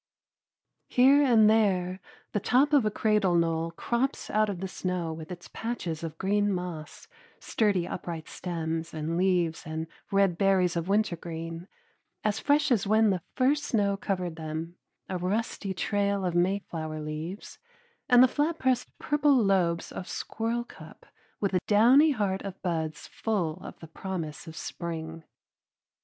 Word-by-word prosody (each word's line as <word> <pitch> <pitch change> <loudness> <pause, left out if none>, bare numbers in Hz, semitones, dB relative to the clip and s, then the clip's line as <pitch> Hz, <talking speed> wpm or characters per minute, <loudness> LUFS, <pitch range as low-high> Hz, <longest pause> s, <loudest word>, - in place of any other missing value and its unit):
Here 270 +3 +6
and 230 -5 +6
there 190 -4 +2 0.3
the 210 - 0
top 270 +8 +3
of 265 -7 +5
a - - +3
cradle 210 -4 +2
knoll 165 -1 +1
crops 235 +10 -2
out 215 0 +2
of 190 -4 -4
the 190 - -3
snow 180 -3 -3
with 160 +2 -9
its 175 -1 -8
patches 185 -9 -4
of 165 -2 -5
green 205 +1 +1
moss, 180 -4 -5 0.3
sturdy 200 -6 +1
upright 165 -2 -5
stems 165 -2 -4
and 160 +2 -2
leaves 175 -3 +1
and 160 0 -4 0.2
red 195 -3 +2
berries 190 -3 +3
of 170 0 -2
wintergreen, 170 -4 -2 0.6
as 215 0 0
fresh 290 -1 +2
as 215 -5 +2
when 215 0 +4
the 185 -2 -1
first 285 +3 +2
snow 205 -6 +1
covered 180 -4 -3
them, 160 +2 -5 0.3
a 185 -1 -3
rusty 200 +2 -2
trail 200 0 0
of 175 - 0
mayflower 175 -4 -1
leaves, 155 - -6 0.5
and 245 0 +8
the - - +7
flat 300 +5 0
pressed 260 -4 0
purple 295 -1 +2
lobes 190 -6 +1
of 180 - -6
squirrelcup 235 +2 -5 0.3
with 200 -2 -1
a 180 - +3
downy 245 +9 +6
heart 200 -8 0
of 195 -1 -7
buds 160 -4 -2
full 180 -8 -2
of - - -9
the 165 - -9
promise 165 -2 -6
of 160 - -9
spring. 165 -1 -5
190 Hz, 150 wpm, -28 LUFS, 165-215 Hz, 0.6 s, and